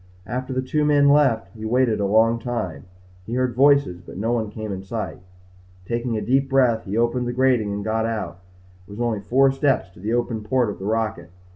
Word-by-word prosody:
After 130 +5 -4
the 130 0 -1
two 150 +4 0
men 145 -1 +4
left 140 -6 +3
he 110 - -9
waited 120 0 +1
a 100 - +1
long 115 +3 +3
time. 115 -9 -4 0.4
He 115 - -3
heard 130 -1 0
voices 140 -8 +3
but 90 - -11
no 110 +4 -1
one 115 -3 -1
came 110 0 -6
in 95 -1 -4
sight. 110 +3 -5 0.7
Taking 115 +1 -2
a - - -2
deep 135 +2 +1
breath, 125 -4 +2
he 100 +2 -3
opened 120 +1 +1
the 120 - -2
grating 125 -5 +2
and 100 0 -4
got 110 +1 0
out. 105 -6 -4 0.5
It - - -22
was 100 +2 -9
only 120 -3 0
four 135 +7 +3
steps 135 -8 0
to - - -18
the 105 +5 -2
open 120 -2 -1
port 115 +1 0
of - - -10
the 95 - -6
rocket. 110 -4 -2
115 Hz, 220 wpm, -22 LUFS, 105-130 Hz, 0.7 s, men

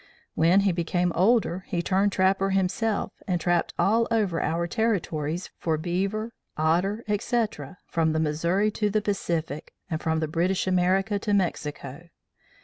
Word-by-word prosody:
When 170 +5 +4
he 195 -1 +2
became 175 +1 0
older, 190 -1 +2
he 175 -1 -2
turned 195 +2 +2
trapper 195 +1 +2
himself, 195 +3 0 0.2
and 180 -2 0
trapped 175 0 +1
all 225 +3 +3
over 205 -7 +1
our 170 +2 0
territories 175 -6 -1
for 160 -2 0
beaver, 195 +7 -2 0.2
otter, 180 +8 +1
etc., 210 - -1
from 160 -1 +1
the 160 - 0
Missouri 170 +7 +1
to 210 0 0
the 215 +1 +1
Pacific, 170 -7 -2 0.2
and 160 - -2
from 160 0 0
British 170 +4 0
America 190 +3 +2
to 205 0 0
Mexico. 150 -5 -3
185 Hz, 140 wpm, -26 LUFS, 165-205 Hz, 0.2 s, When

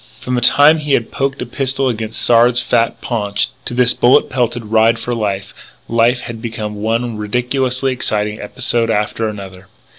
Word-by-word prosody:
From 125 - -4
the 125 - 0
time 145 +6 +5
he 150 -2 -2
had 115 - 0
poked 135 -1 -2
a - - -6
pistol 135 +2 -2
against 110 -2 -3
Sard's 120 +1 +4
fat 120 -1 0
paunch, 105 -3 -1 0.2
to 120 - -2
this 125 0 +4
bullet 130 +4 +3
pelted 120 -2 -1
ride 110 +1 +3
for 120 +2 -4
life, 100 -4 -3 0.3
life 115 +2 +2
had 115 -1 -8
become 110 -2 -5
one 115 +1 -1
ridiculously 125 +4 -1
exciting 105 -4 -2
episode 115 +2 -1
after 110 +1 -1
another. 95 -3 -9
115 Hz, 170 wpm, -16 LUFS, 110-125 Hz, 0.3 s, time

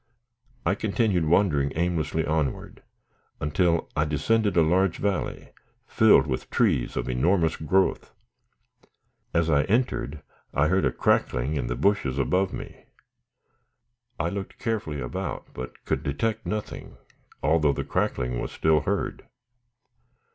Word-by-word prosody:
I - - +3
continued 100 -4 0
wandering 75 -5 +2
aimlessly 80 -2 0
onward, 75 -3 -2 0.6
until 85 +3 +1
I 75 - +2
descended 100 +8 +1
a 85 - +6
large 90 +3 +2
valley, 100 -2 -2 0.4
filled 105 -11 +5
with 65 -4 -4
trees - - +1
of - - -2
enormous 80 +6 +2
growth. 95 +5 +1 1.2
As 85 -1 +1
I 75 -3 +4
entered, 95 - -1 0.3
I 75 +2 +3
heard 95 -3 +2
a 65 - +2
crackling 65 +3 +1
in 65 -5 -2
the 60 - -2
bushes 70 -3 +1
above 90 +7 +1
me. - - -9 1.3
I 85 0 0
looked 100 +1 -6
carefully 105 -10 -2
about, - - -5
but 65 0 -8
could - - -1
detect 80 +10 -2
nothing, 105 -1 -5 0.5
although 75 0 +3
the - - -3
crackling 60 -1 -1
was - - -4
still 80 -1 +3
heard. 100 - -3
80 Hz, 125 wpm, -26 LUFS, 70-95 Hz, 1.3 s, a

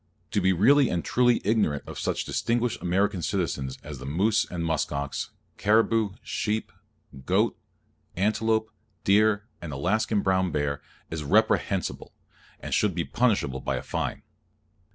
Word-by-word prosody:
To 100 - +1
be 95 +1 +4
really 130 - +5
and 85 -1 -2
truly 120 -1 +3
ignorant 100 -10 +1
of - - -7
such - - -1
distinguished 120 0 -1
American 95 +1 +1
citizens 75 -8 -2
as 75 -3 -8
the 65 - -8
moose 100 +9 +2
and 85 -2 -3
musk 80 -2 0
ox, 70 -1 -3 0.3
caribou, 110 -1 +3
sheep, 110 0 -2 0.6
goat, - - +2 0.6
antelope, 110 +3 +1 0.3
deer 105 +1 +3 0.2
and 85 -3 -6
Alaskan 100 +9 0
brown 95 -2 +1
bear, 70 -1 -1 0.3
is 80 -1 -3
reprehensible, 100 +2 +1 0.4
and - - -5
should 105 -5 +2
be 85 - 0
punishable 100 - +1
by 70 - -1
a 65 - -4
fine. - - -3
95 Hz, 140 wpm, -26 LUFS, 80-110 Hz, 0.6 s, really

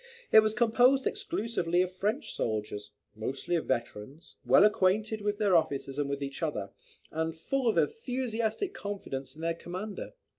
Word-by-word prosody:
It - - +10
was 215 0 +2
composed 245 +4 +4
exclusively 180 -6 0
of 185 - -4
French 210 +10 -1
soldiers, 105 -2 -3 0.3
mostly 135 +10 -2
of 165 - -1
veterans, 125 +4 -4
well 125 +2 +6
acquainted 210 +2 +2
with 205 0 -1
their 205 -4 +3
officers 140 -3 0
and 145 -1 0
with 140 0 -2
each 140 +3 -5
other, 105 -12 -2 0.4
and 160 +1 -2
full 265 +9 -1
of 225 - +2
enthusiastic 255 - -1
confidence 140 - -5
in 160 - -9
their 165 0 +1
commander. 185 +5 -6
180 Hz, 155 wpm, -30 LUFS, 140-220 Hz, 0.4 s, It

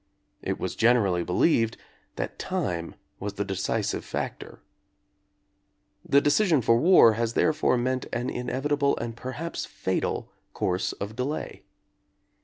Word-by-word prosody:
It - - -3
was - - -3
generally 105 -7 +3
believed 115 - +2 0.4
that - - -5
time 90 - -3 0.2
was 100 +1 -4
the 100 +1 -3
decisive 95 -1 -1
factor. - - -6 1.4
The 140 - +4
decision 150 - +3
for 115 - +4
war 155 -6 +7
has 115 +1 -1
therefore 155 -3 +2
meant 130 +1 -1
an 120 +1 -2
inevitable 140 +4 0
and 115 -1 -4
perhaps 130 +8 -5
fatal 95 -2 -2 0.2
course 90 +1 -1
of 105 +2 -6
delay. 135 +5 -4
120 Hz, 120 wpm, -26 LUFS, 100-140 Hz, 1.4 s, war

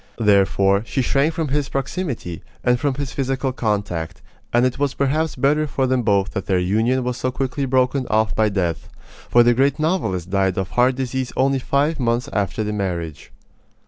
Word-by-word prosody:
Therefore, 100 -2 +3
she 130 +3 -2
shrank 140 +6 +1
from 160 -3 -2
his 145 0 -1
proximity, 135 - -4 0.2
and 125 0 +2
from 140 0 0
his 140 -1 -4
physical 135 0 -1
contact, 100 -8 -3 0.3
and 120 +1 +3
it 130 +1 -1
was 140 -2 0
perhaps 150 +3 0
better 150 +4 +2
for 135 -2 0
them 130 -1 +1
both 100 -3 +1
that 100 - -4
their 95 - +2
union 110 +8 +1
was 125 0 -2
so 130 - -1
quickly 135 +2 -2
broken 130 0 +1
off 110 -2 +1
by 110 -1 +2
death; 90 -5 -2 0.4
for 120 - +6
the 120 0 +4
great 135 +3 +2
novelist 125 - -1
died 95 -2 +1
of 95 -2 -2
heart 125 +1 +3
disease 130 -1 -3
only 135 +1 +2
five 145 +5 0
months 120 -1 0
after 100 +2 -1
the 105 0 -3
marriage. 85 -6 -4
125 Hz, 185 wpm, -21 LUFS, 100-135 Hz, 0.4 s, for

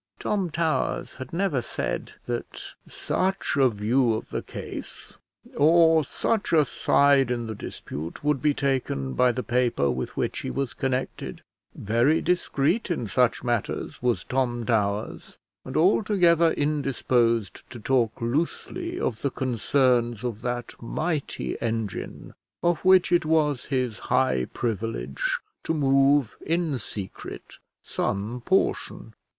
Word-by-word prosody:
Tom 195 -4 -1
Towers 160 0 -1
had 130 -1 -8
never 170 -7 0
said - - -4
that 120 -1 -5
such 190 -2 -1
a 135 -2 +5
view 115 +3 +1
of 110 - -6
the - - -3
case, - - -8 0.4
or 160 +1 +5
such 215 +9 -1
a 155 -3 +5
side 140 -3 +3
in 120 -1 -1
the 110 - -4
dispute, 80 - -7
would 150 -2 +1
be 150 -2 +2
taken 130 - -1
by 125 - +4
the 125 +1 -3
paper 120 - +1
with 65 0 -4
which - - -1
he - - -4
was 135 -3 -2
connected. 130 0 -3 0.3
Very 120 +9 +2
discreet 180 +3 0
in 155 -9 -1
such 125 +3 +2
matters 120 -4 -2
was 120 -1 +1
Tom 120 -3 -1
Towers, 105 -2 -1 0.3
and 130 - -4
altogether 175 -2 +4
indisposed 125 -7 0
to 120 - -8
talk 120 -1 +1
loosely 170 - -2
of 110 -3 -2
the 140 - +1
concerns 125 -2 +1
of 120 -3 -3
that 120 -1 -3
mighty 155 +5 -3
engine 115 -3 -4 0.3
of 175 -2 +1
which 185 -1 +5
it 175 -1 +4
was 155 -4 +1
his 125 -5 -1
high 125 - +1
privilege 105 - -2 0.3
to 160 - -1
move 135 -3 +3
in 165 -4 0
secret 100 -3 -8 0.2
some 105 +5 -2
portion. 190 +7 0
130 Hz, 130 wpm, -26 LUFS, 115-155 Hz, 0.4 s, a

